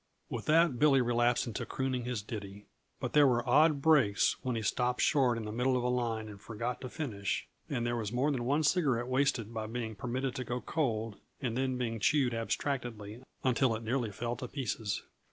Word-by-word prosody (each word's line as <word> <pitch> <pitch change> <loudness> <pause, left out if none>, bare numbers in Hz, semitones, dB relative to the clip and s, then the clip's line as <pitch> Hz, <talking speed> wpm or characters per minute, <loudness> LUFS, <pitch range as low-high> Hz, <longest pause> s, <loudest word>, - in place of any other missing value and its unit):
With 115 - -4
that, 160 -5 +4
Billy 145 -3 +5
relapsed 120 0 +2
into 115 - -4
crooning 130 -2 -2
his 120 -4 -3
ditty. 100 -2 -7 0.3
But - - -4
there 145 -1 +7
were 120 -2 +1
odd 150 -1 +4
breaks 140 -11 +4
when 125 -3 -2
he 110 - -2
stopped 125 +4 0
short 130 -5 +3
in 110 - -4
the 105 - -4
middle 125 +3 +1
of 125 - -1
a 125 - +1
line 115 -3 -1
and 100 -2 -10
forgot 115 +2 -4
to 130 - -5
finish, 110 - -3 0.2
and 120 -4 -1
there 120 0 0
was 110 -3 -3
more 130 +5 +1
than 130 -4 -1
one 145 +5 +1
cigarette 145 -7 +2
wasted 130 -4 0
by 110 -1 -3
being 115 -1 -4
permitted 125 +5 -3
to 130 - -2
go 125 +1 -3
cold 115 -8 -2 0.2
and 120 -3 -2
then 130 0 0
being 115 -2 -2
chewed 130 +2 +2
abstractedly 115 -2 -3 0.2
until 130 -2 +2
it 110 - -6
nearly 115 -1 -1
fell 120 +4 -3
to 125 - -5
pieces. 115 -6 -3
120 Hz, 205 wpm, -32 LUFS, 115-130 Hz, 0.3 s, there